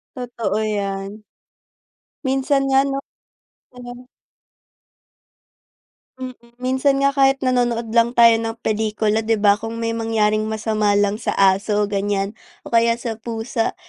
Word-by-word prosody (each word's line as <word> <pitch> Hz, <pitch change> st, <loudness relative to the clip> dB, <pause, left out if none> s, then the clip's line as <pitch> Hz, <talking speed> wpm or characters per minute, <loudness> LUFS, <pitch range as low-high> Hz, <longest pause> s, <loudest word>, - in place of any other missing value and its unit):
Totoo 240 Hz, -4 st, -3 dB
yan. 200 Hz, 0 st, -3 dB, 1.0 s
Minsan 270 Hz, +1 st, +1 dB
nga 270 Hz, 0 st, +4 dB
no? 275 Hz, 0 st, -2 dB, 0.7 s
Ano. 245 Hz, 0 st, -11 dB, 2.1 s
Mm. 255 Hz, 0 st, -5 dB, 0.3 s
Minsan 270 Hz, +2 st, +1 dB
nga 275 Hz, -, +4 dB
kahit 270 Hz, -1 st, +2 dB
nanonood 240 Hz, -3 st, 0 dB
lang 235 Hz, +1 st, +2 dB
tayo 230 Hz, -1 st, +6 dB
ng 225 Hz, 0 st, -3 dB
pelikula 215 Hz, 0 st, 0 dB
di 225 Hz, -, +3 dB
ba? 205 Hz, -1 st, +3 dB
kung 230 Hz, +1 st, -6 dB
may 230 Hz, -, 0 dB
mangyaring 215 Hz, -2 st, 0 dB
masama 215 Hz, -1 st, 0 dB
lang 205 Hz, +1 st, +1 dB
sa -, -, -2 dB
aso 200 Hz, +2 st, +2 dB
o 205 Hz, -, -11 dB
ganyan 200 Hz, 0 st, -1 dB, 0.3 s
o -, -, -11 dB
kaya 230 Hz, 0 st, +3 dB
sa 230 Hz, -1 st, -5 dB
pusa 225 Hz, 0 st, -3 dB
225 Hz, 130 wpm, -20 LUFS, 210-245 Hz, 2.1 s, tayo